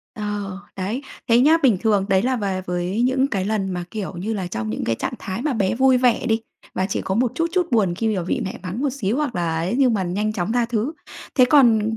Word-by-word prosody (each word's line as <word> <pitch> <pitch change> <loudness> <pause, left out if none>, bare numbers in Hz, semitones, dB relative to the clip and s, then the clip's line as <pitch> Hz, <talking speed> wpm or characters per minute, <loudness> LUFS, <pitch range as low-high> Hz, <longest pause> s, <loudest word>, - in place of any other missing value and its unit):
Ờ, 205 -3 -4 0.2
đấy. 200 +8 -3 0.3
Thế 230 0 +5
nhá, 305 +5 +6
bình 240 -7 +5
thường 205 -4 +2
đấy 190 0 +3
là 255 +1 +1
về 195 -4 -2
với 180 +5 -1
những 260 +2 +2
cái 195 -8 -2
lần 200 -2 -1
mà, 180 -1 -3
kiểu 210 -3 -4
như 200 +6 -3
là, 190 -3 -3
trong 110 -10 -4
những 110 - -3
cái 115 - +1
trạng 250 - -3
thái 195 +4 -5
mà 300 0 0
bé 200 -5 0
vui 260 0 +4
vẻ 245 -1 +2
đi 225 -1 +1 0.3
và 190 - 0
chỉ - - -1
có 190 - -2
một 240 +2 +1
chút 330 - +1
chút 360 -2 +2
buồn 200 -7 +2
khi 220 +2 0
mà 180 - -1
vị 175 - -1
mẹ 190 - -5
mắng 185 +6 -4
một 285 0 +1
xíu 235 -4 -2
hoặc 290 -5 -1
là 170 -2 -1
ấy, 175 +7 -1
nhưng 255 -4 +4
mà 200 - 0
nhanh 200 +4 -1
chóng 205 0 -2
tha 245 0 +2
thứ. 235 +4 -1 0.4
Thế 255 - +6
còn 225 -5 +4
215 Hz, 260 wpm, -22 LUFS, 190-245 Hz, 0.4 s, nhá